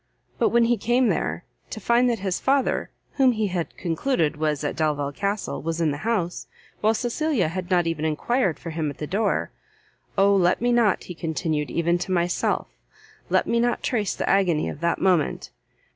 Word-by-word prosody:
But - - +3
when 235 0 +4
he 240 0 +2
came 240 +4 +2
there, - - -2 0.2
to 220 - -6
find 235 +4 +3
that 235 - 0
his 190 -2 -2
father, 275 0 +1 0.3
whom 260 -3 +5
he 215 -2 -1
had 175 -2 -4
concluded 165 - 0
was 150 -1 -1
at 145 - -2
Delvile 145 -3 0
Castle, 200 +6 -3
was 165 +1 -3
in 160 -3 +2
the 145 - -3
house, 190 -4 -2 0.3
while 220 +1 +2
Cecilia 240 - 0
had 180 +1 -5
not 175 -2 +3
even 165 -2 -2
enquired 170 - 0
for 165 - -7
him 155 -2 -2
at 140 - -8
the 150 - -4
door, 200 +6 0 0.7
"Oh 200 +1 +5
let 180 -1 +3
me 245 +1 +1
not," 235 -5 +3
he 180 - -7
continued, 160 -3 -2
"even 170 +1 +1
to 185 - -4
myself, 175 -1 0 0.6
let - - +2
me 235 - +1
not 240 +1 0
trace 215 -6 0
the - - -3
agony 180 -6 +2
of - - -7
that 170 +1 0
moment! 180 -5 +1
185 Hz, 190 wpm, -24 LUFS, 160-230 Hz, 0.7 s, whom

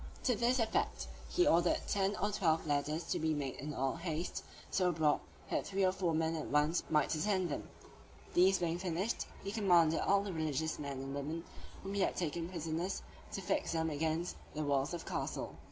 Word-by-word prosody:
To 250 - +3
this 240 +4 +2
effect, 225 -3 0 0.2
he 360 - +3
ordered 170 +1 +4
ten 200 0 +1
or 205 +1 0
twelve 165 -5 +2
ladders 150 +2 0
to - - +1
be 160 0 +1
made 140 -3 -3
in 150 +3 -4
all 135 +1 -1
haste, 165 0 -3 0.3
so 180 -2 +3
broad, 155 -3 +3 0.3
that - - 0
three 195 -1 +2
or 185 - +4
four 180 -3 0
men 160 0 +1
at 155 - -3
once 150 +4 +3
might 150 -1 +3
ascend 185 +2 +1
them: 145 - -4 0.6
these 190 +2 +6
being 170 -1 -1
finished, 185 +4 -1 0.2
he 200 - -3
commanded 175 -7 +4
all 200 0 +3
the 200 -2 -4
religious 160 -1 -1
men 140 -2 -4
and 135 0 -5
women, 150 +4 -3 0.4
whom 195 +1 -4
he 200 - +1
had - - +2
taken 170 0 -2
prisoners, 170 +1 -2 0.3
to 195 - -3
fix 180 - 0
them 160 -1 0
against 160 +3 -1 0.2
the 155 - -1
walls 140 +2 +1
of 170 - -6
the - - -7
castle. - - -2
165 Hz, 200 wpm, -35 LUFS, 155-190 Hz, 0.6 s, these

